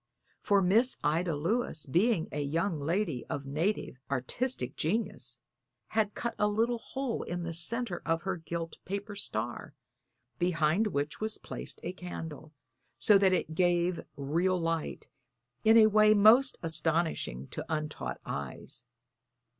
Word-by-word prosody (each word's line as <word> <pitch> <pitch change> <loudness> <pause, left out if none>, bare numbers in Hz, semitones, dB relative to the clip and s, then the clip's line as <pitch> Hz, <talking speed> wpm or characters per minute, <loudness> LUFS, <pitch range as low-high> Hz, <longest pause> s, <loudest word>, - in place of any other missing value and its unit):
For 200 -2 +3
Miss 225 +8 +4
Ida 165 +2 +1
Lewis, 170 - 0
being 175 - +2
a 150 - -2
young 165 +4 -1
lady 160 - -1
of 140 - -3
native 150 0 -1
artistic 140 - -1
genius, 150 - -2 0.5
had 215 -2 0
cut 235 - -2
a 210 - +4
little 230 +3 +1
hole 265 0 -3
in 175 0 -4
the 170 0 -4
centre 195 +4 0
of 165 +1 0
her 190 -1 -2
gilt 165 0 -5
paper 200 +2 -5
star, - - -3 0.6
behind 175 +3 +2
which 145 -3 -2
was 215 0 0
placed - - -6
a - - -3
candle, 160 -4 -7 0.5
so 205 -2 +5
that 190 -1 +4
it 180 -3 0
gave 175 0 +2 0.2
real 170 +7 +1
light, 165 -1 -2 0.6
in 220 +1 +7
a 220 - +9
way 215 0 +6
most 225 +6 +6
astonishing 160 - 0
to - - -5
untaught 150 - -3
eyes. 70 -2 -5
175 Hz, 140 wpm, -30 LUFS, 155-210 Hz, 0.6 s, a